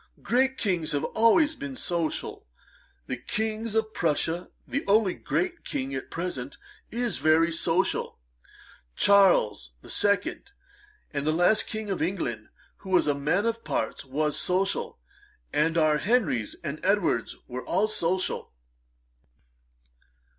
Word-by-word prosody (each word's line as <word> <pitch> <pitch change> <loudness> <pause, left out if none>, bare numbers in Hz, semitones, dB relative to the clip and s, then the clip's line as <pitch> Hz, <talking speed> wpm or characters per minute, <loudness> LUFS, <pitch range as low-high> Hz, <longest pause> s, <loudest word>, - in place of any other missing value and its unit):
Great 265 +2 +2
Kings 175 -8 -1
have 145 - 0
always 290 +8 +4
been 280 -2 -6
social. 170 - -3 0.6
The 130 - -3
King 220 - -2
of 220 -1 0
Prussia, 165 +1 0 0.2
the 280 - -2
only 200 -2 +4
great 360 -1 -2
King 135 +1 -3
at 130 - -5
present, 150 -7 -5 0.3
is 240 0 -2
very 160 +2 +4
social. 165 +3 0 0.8
Charles 175 - +4
the - - -11
Second, 205 - 0 0.6
the 145 +2 0
last 175 +7 +3
King 215 -2 -4
of 190 - -2
England 140 - -2 0.3
who 195 - -11
was 185 -1 +4
a 145 - +2
man 150 +9 0
of 230 0 -1
parts, - - -2
was 150 +2 -1
social; 190 +2 0 0.6
and 160 +3 +2
our 155 -2 +4
Henrys 195 - +1
and 155 -1 -5
Edwards 190 - +1
were 125 +1 -5
all 195 +5 +1
social.' 185 -3 -1
180 Hz, 125 wpm, -27 LUFS, 150-215 Hz, 0.8 s, always